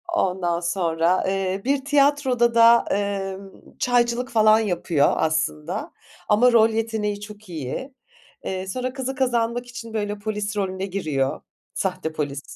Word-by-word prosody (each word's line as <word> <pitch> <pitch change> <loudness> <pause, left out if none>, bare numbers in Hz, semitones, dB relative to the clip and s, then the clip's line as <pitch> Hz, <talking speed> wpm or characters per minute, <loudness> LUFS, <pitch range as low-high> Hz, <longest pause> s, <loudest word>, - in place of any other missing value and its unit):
Ondan 180 - 0
sonra, 175 0 +1
eee, 195 0 -1
bir 275 0 0
tiyatroda 275 -5 +2
da, 230 0 +6
emm, 195 -1 -4
çaycılık 245 0 +1
falan 215 -1 +5
yapıyor 175 -7 +1
aslında 160 +4 -1 0.4
ama 230 +4 +5
rol 225 -1 +5
yeteneği 220 -2 -2
çok 210 -1 -11
iyi. 165 - -5 0.5
Eee, 190 0 -4
sonra 255 +5 -3
kızı 265 0 -4
kazanmak 245 -2 0
için, 230 -2 -9
böyle, 205 -1 -2
polis 210 -1 -3
rolüne 190 -1 -2
giriyor 155 -9 -2 0.3
sahte 185 -4 -2
polis, 145 -2 -3
205 Hz, 130 wpm, -23 LUFS, 185-235 Hz, 0.5 s, da